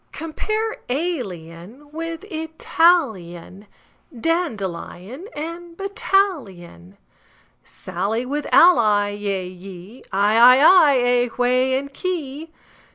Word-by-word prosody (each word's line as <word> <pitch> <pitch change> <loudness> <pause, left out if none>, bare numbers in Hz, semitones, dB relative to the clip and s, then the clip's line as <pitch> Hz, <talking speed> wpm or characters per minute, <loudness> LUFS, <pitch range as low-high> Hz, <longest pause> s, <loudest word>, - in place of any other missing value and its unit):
Compare 430 +7 -3
alien 245 - -5
with 330 +2 -6
Italian, 305 - 0 0.5
Dandelion 235 - -4
with 335 +2 -7
battalion, 270 - -2 0.7
Sally 200 +7 -4
with 290 +3 -4
ally; 215 - +5
yea, 200 -3 -3
ye, 185 +5 -12
Eye, 205 +3 +2
I, 250 +2 +8
ay, 275 - +3
aye, 250 -8 +5
whey, 255 +2 +1
key, 310 -1 -5
quay! 325 - -34
255 Hz, 90 wpm, -21 LUFS, 200-330 Hz, 0.7 s, I